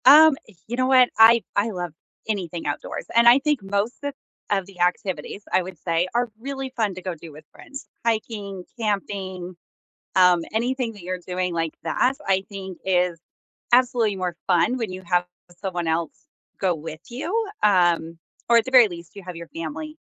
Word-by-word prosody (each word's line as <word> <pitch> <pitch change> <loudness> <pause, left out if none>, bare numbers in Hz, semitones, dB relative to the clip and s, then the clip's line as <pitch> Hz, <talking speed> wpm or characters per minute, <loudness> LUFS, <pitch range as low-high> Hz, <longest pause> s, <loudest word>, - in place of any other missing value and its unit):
Um, 305 +3 +9 0.3
you 235 - -3
know 255 0 +2
what? 255 -2 +6
I 225 +1 +7
I 205 +3 +2
love 175 -5 -4 0.3
anything 180 -6 -3
outdoors, 145 - -4
and 235 0 +6
I 240 +3 +8
think 295 -3 0
most 200 +4 -1
of 285 0 -2 0.4
of 195 -2 +1
the 185 -2 -10
activities, 185 +3 -1
I - - +4
would 180 -1 -8
say, 170 +1 0
are 240 0 +1
really 270 +1 -5
fun 215 -4 0
to 185 - -7
go 185 -1 -4
do 165 0 -11
with 150 +1 -14
friends. 275 0 -10 0.2
Hiking, 210 -4 -2
camping, 195 -4 -3 0.6
um, 180 -2 +6
anything 245 +1 -1
that 205 - -13
you're 180 +1 -4
doing 180 -1 -2
like 165 -1 -1
that, 260 +2 +1
I 190 0 +2
think 190 -3 -7
is 180 -2 +1 0.5
absolutely 240 -4 +4
more 180 -2 -3
fun 180 +9 +3
when 225 -6 -3
you 185 0 -7
have 175 0 +2 0.3
someone 180 -3 -3
else 160 0 0 0.5
go 185 -2 +2
with 160 0 -8
you, 365 - -2 0.2
um, 175 -4 +3 0.3
or 235 - +7
at 230 - +3
the 260 - -5
very 250 -4 +8
least, 170 -1 -10
you 200 - -9
have 180 -1 -7
your 170 0 -8
family, 165 - -6
195 Hz, 180 wpm, -24 LUFS, 175-235 Hz, 0.6 s, Um